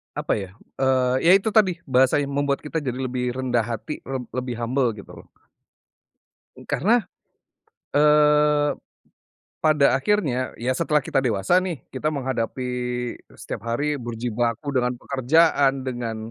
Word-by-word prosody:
apa - - -1
ya, 95 -3 -7 0.2
eee, 130 -1 +2
ya 170 - +7
itu 195 +3 +3
tadi 195 -5 +2
bahasanya 130 +2 +3
membuat 140 0 -1
kita 150 +2 -4
jadi 140 -6 -2
lebih 125 -1 -2
rendah 125 -3 0
hati 115 +6 -5
leb 130 -2 -5
lebih 125 -1 -4
humble 120 0 +1
gitu. 105 -1 -12 1.4
Karena, 230 +5 +2 1.0
eee, 150 0 +4 0.9
pada 150 -3 +4
akhirnya, 135 -7 0
ya 120 +2 -1
setelah 150 -1 +2
kita 135 - -1
dewasa 110 - +2
nih 175 -6 -5
kita 150 +4 -2
menghadapi 130 -3 -3 0.7
setiap - - -7
hari 150 +5 0
berjibaku 120 +1 -3
dengan 125 0 +1
pekerjaan, 135 0 +2
dengan 120 -3 -4
130 Hz, 125 wpm, -23 LUFS, 125-150 Hz, 1.4 s, ya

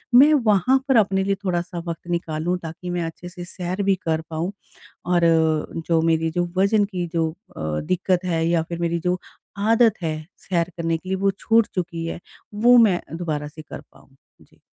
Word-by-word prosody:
मैं 290 +5 +8
वहाँ 230 - +4
पर 265 - +3
अपने 195 -3 +3
लिए 195 0 +1
थोड़ा-सा 175 -1 -2
वक़्त 170 +1 -6
निकालूँ 170 0 -1
ताकि 165 +2 -7
मैं 175 -1 -1
अच्छे-से 175 +2 -7
सैर 180 +2 -4
भी 195 0 +3
कर 160 -1 +1
पाऊँ 165 +3 -2 0.6
और 175 - +3 0.7
जो 165 -1 +3
मेरी 165 0 +2
जो 175 +2 0
वज़न 200 +2 +4
की 180 -4 -4
जो 165 -1 +1 0.3
अ, 80 0 -2
दिक्कत 185 +2 0
है 165 -2 0
या 170 -1 +2
फिर 170 -1 -4
मेरी 170 0 0
जो 180 +2 0 0.4
आदत 225 +2 +4
है, 155 -2 -3
सैर 170 -2 -1
करने 165 -1 0
के 185 +3 -11
लिए 190 - +1
वो 195 +1 +2
छूट 225 -1 +3
चुकी 170 -2 -3
है, 165 - -4 0.3
वो 240 +4 +5
मैं 210 -7 +5 0.2
दोबारा 155 -4 -3
से 155 +1 -11
कर 155 - -9
पाऊँ। 135 - -23 0.3
जी। - - -24
175 Hz, 185 wpm, -23 LUFS, 165-195 Hz, 0.7 s, मैं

